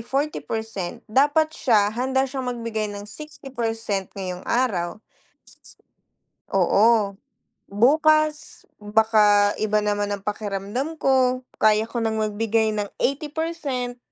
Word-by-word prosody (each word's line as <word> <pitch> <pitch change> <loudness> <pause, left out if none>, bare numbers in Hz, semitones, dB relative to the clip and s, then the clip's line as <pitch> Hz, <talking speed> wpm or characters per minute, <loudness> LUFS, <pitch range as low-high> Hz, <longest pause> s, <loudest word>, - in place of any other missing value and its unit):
40% 220 - -3
dapat 295 +5 +3
siya 215 -10 +2
handa 265 +3 0
siyang 265 -1 -5
magbigay 230 -3 -3
ng 205 0 -7
60% 225 -5 -4
ngayong 180 -2 -5
araw. 215 -6 0 1.5
Oo, 200 +2 +3 0.5
bukas 305 +7 +2 0.2
baka 210 -1 +3
iba 215 0 +1
naman 205 0 -1
ang 200 - -5
pakiramdam 210 +7 -3
ko 255 -1 +3 0.2
kaya 215 +1 +3
ko - - -5
ng 220 -1 0
magbigay 220 +1 +1
ng 210 -1 -2 0.2
80% 285 -3 -2
225 Hz, 100 wpm, -23 LUFS, 205-265 Hz, 1.5 s, dapat